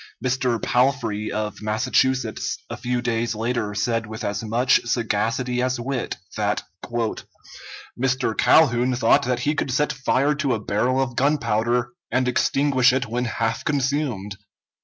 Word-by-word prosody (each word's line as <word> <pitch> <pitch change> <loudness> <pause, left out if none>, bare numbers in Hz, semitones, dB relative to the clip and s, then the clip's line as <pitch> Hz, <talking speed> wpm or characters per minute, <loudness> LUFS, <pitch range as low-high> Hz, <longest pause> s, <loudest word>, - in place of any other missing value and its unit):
Mr. 125 -2 +1
Palfrey, 120 -5 0
of 105 0 -3
Massachusetts, 110 +3 0
a - - -3
few 125 0 -2
days 115 -1 -1
later 110 -2 -2
said 115 +2 -1
with 110 0 -7
as 100 - -2
much 120 +4 +2
sagacity 120 +2 0
as 130 0 0
wit 130 +1 -3 0.2
that 105 -1 0 1.4
"Mr. 130 -3 0
Calhoun 125 -1 +4
thought 120 -1 +3
that 125 -1 -1
he 145 +4 +1
could 150 - -2
set 150 +4 +1
fire 135 +2 +1
to 140 -4 0
a - - -3
barrel 115 +5 0
of 125 -3 -1
gunpowder 120 -3 +1 0.2
and 130 +1 +1
extinguish 130 0 +3
it 130 0 0
when 120 +2 -2
half 115 -1 -2
consumed." 135 - -1
125 Hz, 140 wpm, -23 LUFS, 115-130 Hz, 1.4 s, Calhoun